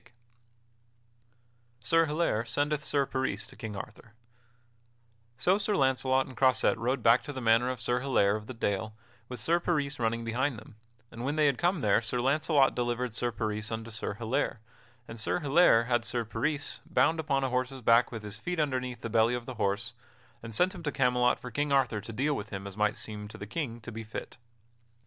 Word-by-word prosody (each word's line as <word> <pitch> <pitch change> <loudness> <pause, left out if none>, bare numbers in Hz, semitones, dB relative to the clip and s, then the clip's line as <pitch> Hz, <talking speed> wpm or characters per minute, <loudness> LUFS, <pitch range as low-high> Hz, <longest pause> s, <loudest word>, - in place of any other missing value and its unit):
[Sidenote: 120 - -24 1.7
Sir 165 0 +4
Hilaire 150 -8 0
sendeth 145 +5 0
Sir 140 -1 +1
Peris 130 -7 -2
to - - -15
King 110 -2 -6
Arthur] 110 0 -9 1.2
So 190 +3 +3
Sir 210 0 0
Launcelot 130 -1 +2
and 130 -3 -11
Croisette 130 -3 +3
rode 125 +4 -1
back 115 +2 +6
to 145 - -7
the 135 - -5
manor 115 +1 +3
of 130 -2 -3
Sir 120 +2 0
Hilaire 120 -7 +2
of 105 0 -6
the 130 - -7
Dale 105 0 -2 0.3
with 125 -2 -6
Sir 170 +9 +2
Peris 150 -5 -1
running 115 0 0
behind 125 +3 -1
them, 110 0 -13 0.4
and 115 - -7
when 145 +3 -1
they 155 -1 +3
had 140 -3 +2
come 175 -1 +1
there 105 0 +3
Sir 120 +2 -1
Launcelot 140 +2 +3
delivered 120 -1 -2
Sir 120 +2 -1
Peris 110 -1 -3
unto 115 0 -5
Sir 110 -2 -4
Hilaire, 115 +2 -1 0.5
and 115 - -8
Sir 110 - 0
Hilaire 145 -5 +5
had 120 -1 +1
Sir 115 +1 -2
Peris 140 +7 -2
bound 165 -1 +2
upon 140 -4 0
a 135 - 0
horse's 130 +1 -2
back 115 +1 +4
with 115 -3 -6
his 105 -1 -6
feet 175 +8 -3
underneath 125 -5 -1
the - - -3
belly 115 +2 +3
of 120 -1 -5
the 130 - -6
horse; 100 +4 -1 0.5
and 115 -1 -8
sent 180 +7 +3
him 180 - -9
to 150 -3 -2
Camelot 125 -2 +2
for 125 - -9
King 145 +4 -1
Arthur 125 -6 +2
to 110 - -8
deal 135 +7 0
with 105 -2 -5
him 100 -1 -6
as 100 -1 -7
might 105 0 +1
seem 105 -1 -5
to 105 - -11
the 100 - -7
King 120 0 -4
to 120 - -8
be 115 0 -6
fit. 110 +2 -7
125 Hz, 205 wpm, -29 LUFS, 110-140 Hz, 1.7 s, back